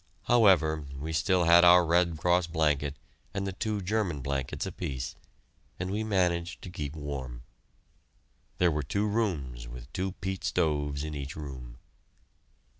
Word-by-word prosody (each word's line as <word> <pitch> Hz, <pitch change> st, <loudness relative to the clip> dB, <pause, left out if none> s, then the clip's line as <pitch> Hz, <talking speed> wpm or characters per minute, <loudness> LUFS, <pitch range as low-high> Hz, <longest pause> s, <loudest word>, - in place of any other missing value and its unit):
However, 80 Hz, -10 st, +4 dB
we 75 Hz, +4 st, -5 dB
still 90 Hz, +3 st, +2 dB
had 85 Hz, +1 st, +7 dB
our 90 Hz, 0 st, +7 dB
Red 85 Hz, 0 st, +2 dB
Cross 90 Hz, +1 st, +2 dB
blanket 75 Hz, -3 st, 0 dB, 0.4 s
and 100 Hz, 0 st, -1 dB
the 95 Hz, -, -3 dB
two 105 Hz, +2 st, -2 dB
German 95 Hz, -7 st, -1 dB
blankets 65 Hz, -1 st, -3 dB
apiece, 65 Hz, -3 st, -4 dB, 0.6 s
and 90 Hz, +1 st, -3 dB
we 105 Hz, +2 st, -1 dB
managed 90 Hz, -4 st, 0 dB
to 90 Hz, -, -7 dB
keep 75 Hz, -4 st, -5 dB
warm. 65 Hz, -5 st, -6 dB, 1.1 s
There 90 Hz, -1 st, +3 dB
were 75 Hz, 0 st, -1 dB
two 100 Hz, +9 st, -1 dB
rooms 80 Hz, -, -2 dB
with -, -, -10 dB
two 95 Hz, -1 st, -2 dB
peat 95 Hz, -1 st, -5 dB
stoves 75 Hz, -2 st, 0 dB
in 75 Hz, 0 st, -4 dB
each 70 Hz, 0 st, -5 dB
room. 65 Hz, -5 st, -8 dB
80 Hz, 145 wpm, -29 LUFS, 70-95 Hz, 1.1 s, had